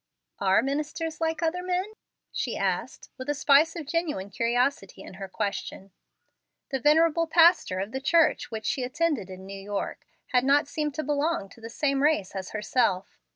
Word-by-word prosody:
"Are 190 0 +3
ministers 305 +3 -3
like 325 0 -1
other 335 +2 0
men?" 365 +3 -2 0.4
she - - -2
asked, - - -2
with 260 +2 -6
a 290 - +1
spice 290 +3 +4
of 325 -3 -5
genuine 300 - -2
curiosity 235 -3 0
in - - -11
her 195 - -4
question. 195 -1 -4 0.8
The 270 - 0
venerable 325 +4 +4
pastor 325 - +4
of 200 +3 -3
the 265 - -4
church 330 +3 +3
which 220 -1 -6
she 265 - 0
attended 255 - -1
in 190 0 -9
New 195 - -8
York 200 0 -5 0.2
had 250 -2 +3
not 280 +2 +3
seemed 300 -1 -3
to 310 - -2
belong 290 -6 -1
to 230 - -17
the 225 - -7
same 275 +3 0
race 285 -11 +1
as 190 -1 -5
herself. 210 -3 -1
280 Hz, 175 wpm, -27 LUFS, 205-320 Hz, 0.8 s, spice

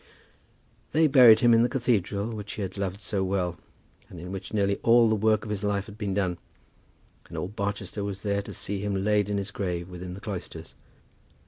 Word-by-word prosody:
They 160 +1 +4
buried 125 -7 +7
him 120 -1 +6
in 115 - +6
the 120 - +3
cathedral 110 -5 0
which 105 -1 -6
he 105 - -4
had 95 0 -5
loved 100 -1 -3
so 100 -2 -1
well, 90 -3 -1 0.5
and 90 - -10
in 90 +2 -7
which 95 -1 -6
nearly 100 -2 +1
all 115 0 +5
the 110 - +2
work 110 0 +2
of 105 - -5
his 105 -1 -3
life 100 -1 0
had 105 0 -13
been 100 -3 -2
done; 90 -3 -1 0.9
and - - -7
all 90 - -3
Barchester 100 -1 -4
was 100 -1 -5
there 100 -1 0
to - - -9
see 100 0 -4
him 100 -1 -2
laid 105 -1 +2
in 100 - 0
his 100 +1 -4
grave 90 -3 -3
within 90 0 -7
the - - -9
cloisters. 90 -5 -7
100 Hz, 210 wpm, -27 LUFS, 95-110 Hz, 0.9 s, buried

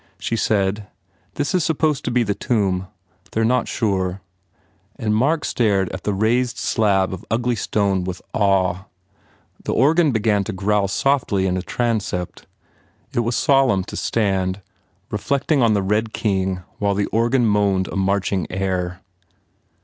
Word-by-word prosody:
She 115 - -2
said, 105 -2 0 0.5
"This 145 - -1
is 180 -3 +2
supposed 155 -3 0
to - - 0
be 120 0 +2
the 100 -2 0
tomb. 95 -5 0 0.5
They 110 - +1
re - - +3
not 125 0 +1
sure," 95 -4 -1 0.8
and 105 -2 -1
Mark 145 +7 +1
stared 100 -5 +1
at 95 - -7
the 105 - +1
raised 120 +4 +1
slab 95 -4 +1
of 95 - -7
ugly 120 +2 0
stone 100 -2 0
with 90 0 -4
awe. 95 -3 +1 0.8
The - - -2
organ 155 +4 +4
began 110 -3 +1
to 110 - -4
growl 100 +1 +1
softly 115 -3 +1
in 90 -1 0
a 90 - -1
transept. 105 -5 -2 0.7
It - - 0
was 120 0 0
solemn 135 -9 +3
to - - -8
stand, 95 -3 -1 0.5
reflecting 140 +1 0
on 115 -3 +4
the 100 - +1
Red 105 +3 0
King 95 -3 -1 0.2
while 100 -1 +1
the 100 0 +1
organ 120 +2 +1
moaned 100 -3 +2
a - - -7
marching 95 -2 0
air. 90 -1 -2
105 Hz, 155 wpm, -21 LUFS, 95-120 Hz, 0.8 s, organ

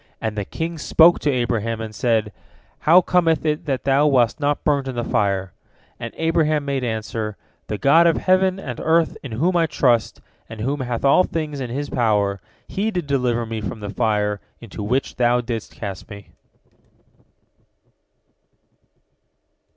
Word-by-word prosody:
And 110 -1 -3
the 105 -2 -3
king 165 - -4
spoke 165 +3 +5
to 150 - 0
Abraham, 115 -3 -1
and 110 -1 -6
said, 110 -2 0 0.5
"How 170 +4 +6
cometh 165 -3 +1
it 155 +1 -1
that 135 -3 -1
thou 140 +2 +3
wast 125 -2 +2
not 145 0 0
burnt 140 -2 +1
in 130 - -4
the 120 - -2
fire?" 100 -6 0 0.5
And - - -5
Abraham 155 -2 +1
made 140 -2 -2
answer, 110 -2 -3 0.3
"The 105 - -3
God 165 +9 +5
of 165 - +3
heaven 185 0 +2
and 125 -10 -6
earth 160 0 +2
in 130 -5 -7
whom 170 +11 +1
I 165 -1 +3
trust, 125 -7 +1 0.3
and 115 -1 -9
who 135 +6 -1
hath 125 -2 -3
all 140 +6 +5
things 155 -5 -4
in 130 -2 -4
His 140 +4 -3
power, 105 -5 +1 0.3
He 205 +3 -1
did 180 -7 -3
deliver 125 -4 0
me 110 -1 -5
from 105 +1 -5
the 105 -2 -6
fire 105 -1 0 0.2
into 115 -2 -9
which 125 +6 -1
thou 120 0 +3
didst 115 -2 -5
cast 100 -4 -7
me." 100 -2 -11
125 Hz, 165 wpm, -21 LUFS, 110-155 Hz, 0.5 s, How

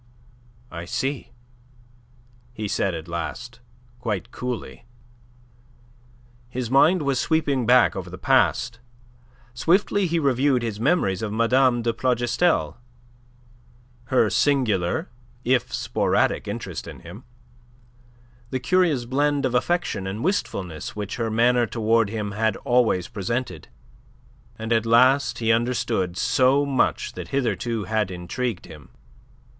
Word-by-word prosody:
"I 85 0 -6
see," 135 +9 -3 1.2
he 110 -3 -4
said, 95 -2 -1
at 80 +1 -7
last, 85 +8 -6 0.4
quite 105 -7 -3
coolly. 125 -2 -6 1.6
His 125 -1 -4
mind 160 +5 +4
was 140 -2 0
sweeping 140 -5 0
back 125 +1 +5
over 90 -2 -6
the 90 - -8
past. 120 -2 +1 0.7
Swiftly 185 - +2
he 170 0 0
reviewed 135 -3 +2
his 110 -3 -4
memories 115 - +1
of 110 -2 -3
Mme. 120 +2 +2
de 115 0 0
Plougastel, 120 - +1 1.3
her 125 -3 +3
singular 125 - +1 0.3
if 125 0 +1
sporadic - - 0
interest - - -5
in - - -10
him, 90 +8 -11 1.3
the 130 - -2
curious 150 -2 +2
blend 145 +2 +1
of 130 - -1
affection 125 - 0
and 105 +5 -4
wistfulness 95 - -3
which 105 +1 -5
her 115 -2 -1
manner 120 +2 +3
towards 115 -1 +1
him 105 -2 -3
had 110 0 0
always 120 -8 +2
presented, 110 - -4 0.9
and 110 +1 -2
at 115 0 +1
last 130 +4 +4
he 115 -1 +1
understood 115 -6 0
so 130 +4 +3
much 135 -2 0
that - - -7
hitherto 120 -4 -1
had 105 +1 -1
intrigued 90 +5 -4
him. 75 -5 -13
120 Hz, 120 wpm, -23 LUFS, 105-130 Hz, 1.6 s, back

